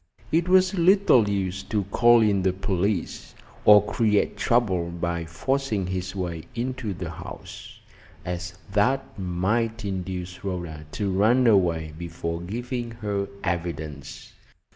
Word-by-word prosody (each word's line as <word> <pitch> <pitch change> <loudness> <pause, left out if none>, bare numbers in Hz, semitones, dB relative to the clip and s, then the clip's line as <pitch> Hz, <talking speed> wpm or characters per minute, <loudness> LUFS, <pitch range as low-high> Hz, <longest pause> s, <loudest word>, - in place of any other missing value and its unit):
It 170 +3 +2
was 185 0 +5
little 180 - +4
use 95 -1 -1
to 105 -2 -1
call 120 +5 +5
in 100 -3 +3
the 95 0 +1
police, 95 +1 -2 0.3
or 105 -1 +8
create 105 -2 +1
trouble 95 -8 +1
by 85 0 -3
forcing 110 +4 -1
his 95 +1 -4
way 85 -4 -4
into 125 -2 -3
the 85 -2 -5
house, 80 - -10 0.5
as 90 0 -4 0.2
that 125 +7 +2
might 105 +5 -1
induce 90 -2 -5
Rhoda 85 -5 -5
to 100 -2 -1
run 110 +7 +3
away 85 -8 +3
before 85 0 -5
giving 120 +5 -4
her 105 -3 -3 0.2
evidence. 80 -5 -4
95 Hz, 125 wpm, -25 LUFS, 90-115 Hz, 0.5 s, or